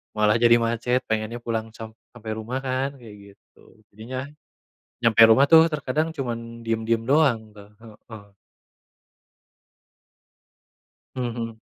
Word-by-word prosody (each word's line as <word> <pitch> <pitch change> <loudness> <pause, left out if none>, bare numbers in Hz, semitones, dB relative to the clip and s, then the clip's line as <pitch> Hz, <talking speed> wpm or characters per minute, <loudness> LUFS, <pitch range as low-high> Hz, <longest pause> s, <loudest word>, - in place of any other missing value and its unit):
Malah 105 +1 +2
jadi 120 0 +5
macet 120 +2 0
pengennya 110 +2 -3
pulang 115 -1 -4
sam 110 0 -9 0.2
sampai 110 -2 -7
rumah 125 +5 -5
kan 135 +1 -2
kayak 105 -5 -15
gitu. 110 - -25
Jadinya, 125 +5 -7 0.8
nyampe 115 -1 +3
rumah 115 +5 +5
tuh 160 0 +8
terkadang 150 +3 -2
cuman 115 -4 -6
diem-diem 115 0 -1
doang 130 -8 +2
tuh, 100 0 -14
heeh. 110 -1 -14 2.9
Mhm 130 - -3 0.2
mhm. 115 -1 -6
115 Hz, 120 wpm, -23 LUFS, 110-130 Hz, 2.9 s, tuh